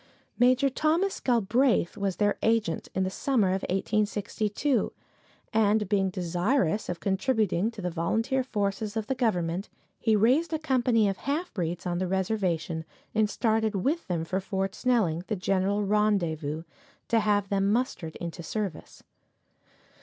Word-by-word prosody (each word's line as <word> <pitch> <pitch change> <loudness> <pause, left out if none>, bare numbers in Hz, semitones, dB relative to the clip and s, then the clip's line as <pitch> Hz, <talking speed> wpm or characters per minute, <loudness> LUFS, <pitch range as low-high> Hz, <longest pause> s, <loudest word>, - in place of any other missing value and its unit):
Major 255 +3 +4
Thomas 320 +8 +1
Galbraith 235 -4 +2
was 195 -2 -1
their 205 -1 +1
agent 220 -7 +1
in 190 - +1
the 185 - -1
summer 230 -4 +1
of 190 +1 0
1862, 210 +5 0 0.6
and 215 -1 +3
being 195 -1 +2
desirous 180 - 0
of 175 -1 -3
contributing 205 -1 +1
to 225 -4 -9
the 180 - -1
volunteer 225 +10 0
forces 205 -2 -2
of 220 - -1
the 265 - -1
government, 185 -7 -1 0.3
he 220 -2 +3
raised 265 +10 +3
a - - +2
company 250 -7 +2
of 195 -1 -1
half 310 +6 -3
breeds 175 -2 -3
on 175 -1 -1
the 185 - -1
reservation 180 -4 -1 0.3
and 215 -1 +2
started 220 0 +1
with 280 - 0
them 170 -3 -1
for 185 +3 -1
Fort 195 0 -2
Snelling, 205 -10 +1
the 215 - -1
general 195 +2 0
rendezvous, 175 -7 0 0.4
to 230 - +3
have 205 -2 +1
them 200 0 +2
mustered 220 - -1
into 170 0 -6
service. 195 -1 -5
205 Hz, 145 wpm, -28 LUFS, 185-230 Hz, 0.6 s, Major